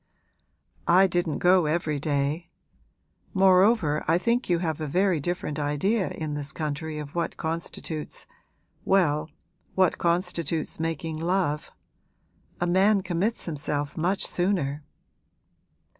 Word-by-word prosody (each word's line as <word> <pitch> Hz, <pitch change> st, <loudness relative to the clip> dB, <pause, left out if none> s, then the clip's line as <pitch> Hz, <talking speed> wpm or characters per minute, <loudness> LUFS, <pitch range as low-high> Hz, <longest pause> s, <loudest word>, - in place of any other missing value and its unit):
'I 185 Hz, +3 st, +6 dB
didn't 175 Hz, -4 st, 0 dB
go 180 Hz, -2 st, +4 dB
every 155 Hz, -2 st, 0 dB
day. 145 Hz, +3 st, -1 dB, 0.9 s
Moreover 190 Hz, -4 st, +4 dB
I 165 Hz, -, +4 dB
think 235 Hz, +5 st, 0 dB
you 175 Hz, -, +3 dB
have 160 Hz, -3 st, -2 dB
a 155 Hz, -, -2 dB
very 180 Hz, +2 st, +2 dB
different 150 Hz, -1 st, -3 dB
idea 165 Hz, +9 st, 0 dB
in 155 Hz, -2 st, -4 dB
this 145 Hz, 0 st, -4 dB
country 155 Hz, 0 st, -4 dB
of 150 Hz, -1 st, -7 dB
what 170 Hz, -1 st, -2 dB
constitutes 160 Hz, -1 st, -4 dB, 0.6 s
well, 160 Hz, -5 st, +2 dB, 0.5 s
what 185 Hz, -2 st, +3 dB
constitutes 170 Hz, -3 st, -1 dB
making 165 Hz, -1 st, -3 dB
love. 170 Hz, -3 st, 0 dB, 0.9 s
A 175 Hz, -, +1 dB
man 195 Hz, +3 st, +4 dB
commits 185 Hz, +5 st, -1 dB
himself 145 Hz, -2 st, -3 dB
much 185 Hz, +4 st, 0 dB
sooner.' 165 Hz, -6 st, -1 dB
165 Hz, 115 wpm, -26 LUFS, 150-185 Hz, 0.9 s, I